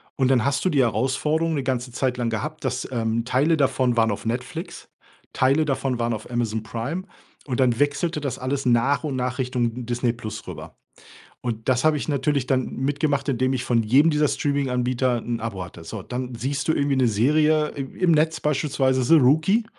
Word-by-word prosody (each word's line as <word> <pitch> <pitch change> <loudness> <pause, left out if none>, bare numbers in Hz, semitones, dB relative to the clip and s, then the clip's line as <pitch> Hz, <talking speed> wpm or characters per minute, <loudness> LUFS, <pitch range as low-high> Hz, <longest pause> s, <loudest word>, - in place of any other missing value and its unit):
Und 130 - +2
dann 120 -4 +3
hast 140 0 0
du 185 - +4
die 140 -5 +3
Herausforderung 150 +8 0
'ne 140 - -2
ganze 125 -1 -2
Zeit 125 +1 -1
lang 120 -1 -1
gehabt, 150 +8 -4
dass 130 -1 -2
ähm, 115 -1 -1
Teile 145 +6 +2
davon 130 -3 +1
waren 115 -1 +3
auf 100 - -5
Netflix, 130 +9 -5 0.4
Teile 135 +4 +3
davon 135 -3 -1
waren 115 0 0
auf 110 +1 -7
Amazon 110 -2 -1
Prime. 125 +10 -4 0.4
Und 130 -2 -3
dann 125 -3 +3
wechselte 145 +2 0
das 135 -3 -3
alles 135 +1 -2
nach 125 +5 +2
und 140 -4 -2
nach 125 +1 -2
Richtung 125 -2 -2
Disney+ 120 0 0 0.3
rüber. 80 -2 -9 0.6
Und 115 -1 -5
das 130 +2 +2
habe 155 -1 +4
ich - - -5
natürlich 140 -2 0
dann 130 -1 +1
mitgemacht, 140 +1 -1
indem 130 0 +1
ich 130 -2 -1
von 115 -2 +2
jedem 140 +9 +5
dieser 150 0 +2
Streaminganbieter 125 -3 0
'n 120 +1 -3
Abo 105 -5 -4
hatte. 85 -1 -12
So. 110 +1 -6
Dann 125 +2 -5
siehst 135 +4 -3
du - - +5
irgendwie 140 -1 +1
'ne 130 -2 +3
Serie 150 +7 +3
im 135 -1 -7
im 180 -2 +2
Netz, 160 +1 +2
beispielsweise 135 -3 +1
„The 165 - +5
Rookie”, 160 - +3
130 Hz, 195 wpm, -23 LUFS, 120-145 Hz, 0.6 s, jedem